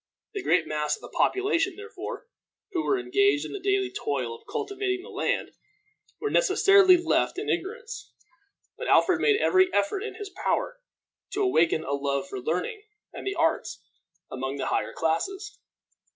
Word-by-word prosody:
The 400 - -3
great 180 - +2
mass 150 -1 -1
of - - -19
the - - -11
population, 390 -2 +1
therefore, 440 +4 -7 0.5
who 340 -3 -1
were 405 - +2
engaged 395 -3 +2
in - - -7
the 405 - -4
daily 390 0 +1
toil 130 -5 -2
of 115 - -14
cultivating 400 -3 -2
the - - -11
land, - - -1 0.7
were 430 - -2
necessarily 395 -6 +6
left 345 +2 +1
in 405 - -1
ignorance; 445 +7 -5 0.7
but - - -4
Alfred 355 -3 +4
made 430 -1 +4
every 375 -4 +4
effort 200 - +1
in 445 - -5
his 410 -2 -7
power - - -1 0.5
to 410 - 0
awaken 165 - +3
a 140 - -3
love 140 -1 -1
for 130 - -6
learning 180 - -2 0.3
and - - -7
the 395 - -1
arts - - 0 0.5
among 135 +1 -3
the 140 - -3
higher - - 0
classes. 385 - -2
375 Hz, 165 wpm, -27 LUFS, -, 0.7 s, necessarily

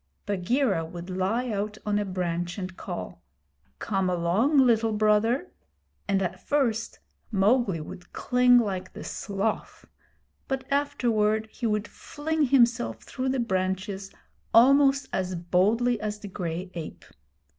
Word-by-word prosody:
Bagheera 205 - +1
would 175 +3 -8
lie 220 +7 -1
out 210 +1 -3
on 205 0 +1
a 205 - -1
branch 175 -1 -3
and 185 -2 -5
call, - - -7 0.6
'Come 195 -3 -1
along, 180 - +2
Little 230 -4 +4
Brother,' 215 - +2 0.6
and 195 -1 +1
at 180 - -4
first 240 -6 0 0.3
Mowgli 205 -2 +2
would 155 +3 -10
cling 250 0 +4
like 190 -5 -1
the - - -8
sloth, 200 +2 -3 0.6
but 270 -1 -2
afterward 225 -7 +1
he 235 - -3
would 210 -1 -1
fling 310 +1 -2
himself 240 -2 +2
through 260 0 -3
the 260 0 0
branches 190 -2 -2 0.5
almost 275 +3 +6
as 185 -1 -1
boldly 205 +7 +1
as 210 -1 -3
the 210 - -9
gray 180 -1 -4
ape. 165 -3 -7
210 Hz, 130 wpm, -27 LUFS, 185-245 Hz, 0.6 s, almost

